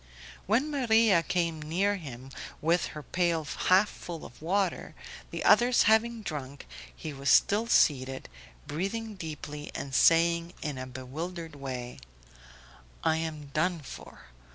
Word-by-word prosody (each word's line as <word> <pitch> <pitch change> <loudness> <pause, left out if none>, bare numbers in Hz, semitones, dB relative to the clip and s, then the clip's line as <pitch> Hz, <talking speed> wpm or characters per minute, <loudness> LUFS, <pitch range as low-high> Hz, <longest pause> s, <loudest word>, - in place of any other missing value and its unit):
When 255 +9 +2
Maria 225 - +4
came 165 -2 -1
near 190 +7 0
him 135 -6 -9 0.3
with 170 +2 +2
her 150 - -7
pail 170 -2 0
half 185 +7 +3
full 170 -5 -8
of 120 - -13
water, 185 +2 -1 0.3
the - - -4
others 245 0 +5
having 220 +1 +3
drunk, 140 -5 -6 0.3
he 155 -2 -6
was 140 0 -2
still 215 +10 +4
seated, 135 - +2 0.4
breathing 210 +8 -3
deeply 150 -4 -7
and 135 - -5
saying 170 +3 +4
in 145 -4 -3
a 130 - -5
bewildered 160 +6 -6
way: 130 -3 -6 1.0
"I 160 - +2
am 155 -3 -5
done 170 +3 +1
for 135 - -11
165 Hz, 130 wpm, -29 LUFS, 145-195 Hz, 1.0 s, others